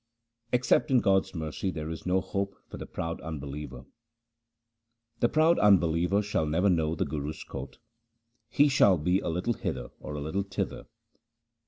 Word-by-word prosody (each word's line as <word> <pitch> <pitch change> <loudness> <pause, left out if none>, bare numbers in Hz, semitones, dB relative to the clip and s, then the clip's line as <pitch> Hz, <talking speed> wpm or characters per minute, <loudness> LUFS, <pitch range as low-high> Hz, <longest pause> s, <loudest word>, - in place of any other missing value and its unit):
Except 125 0 +2
in 130 -2 +5
God's 95 -3 +2
mercy 80 +4 -3
there 80 -3 -4
is 80 - -7
no 95 +1 +2
hope 100 +1 -3
for - - -9
the - - -7
proud 85 0 -4
unbeliever: 75 -4 -7 0.7
— 115 0 -51
The 120 - +3
proud 160 +2 +4
unbeliever 90 0 +3
shall 100 -6 -1
never 90 +6 +2
know 80 -2 +1
the - - -1
Guru's 75 0 -4
court; 70 0 -8 0.7
he 145 0 +4
shall 105 -9 +5
be 90 +5 +1
a - - -3
little 90 +8 0
hither - - -4
or 75 - -7
a - - -4
little 80 +7 -2
thither. 100 -1 -4
90 Hz, 165 wpm, -28 LUFS, 80-110 Hz, 0.7 s, in